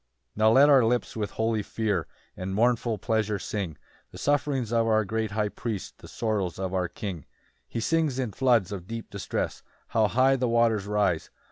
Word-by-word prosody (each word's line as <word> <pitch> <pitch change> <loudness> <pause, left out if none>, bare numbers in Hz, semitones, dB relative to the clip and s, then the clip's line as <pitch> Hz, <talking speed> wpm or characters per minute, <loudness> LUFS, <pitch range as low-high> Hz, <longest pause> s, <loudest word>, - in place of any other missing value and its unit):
1 110 - -2
Now - - +6
let 135 +5 +7
our 135 -4 +6
lips 120 +2 0
with 105 -2 -2
holy 110 -1 0
fear 105 -1 -1 0.3
And 95 +1 -4
mournful 115 0 +2
pleasure 110 -2 0
sing 95 -7 -4 0.3
The - - -12
sufferings 140 -5 0
of 115 -1 +3
our 110 -1 +3
great 110 +2 -1
High 105 0 -1
Priest, 110 -2 -5
The - - -12
sorrows 105 -6 -2
of 95 -1 -3
our 90 -1 0
King. 90 -1 -6
2 - - -25 0.4
He - - -4
sinks 155 -1 +1
in 125 -5 -1
floods 120 -6 +2
of 95 -3 -6
deep 115 +1 -6
distress: 100 - -3 0.3
How 110 -1 +3
high 130 +4 +3
the 125 -2 0
waters 115 -4 +2
rise! 105 -6 +1
110 Hz, 195 wpm, -27 LUFS, 100-120 Hz, 0.4 s, let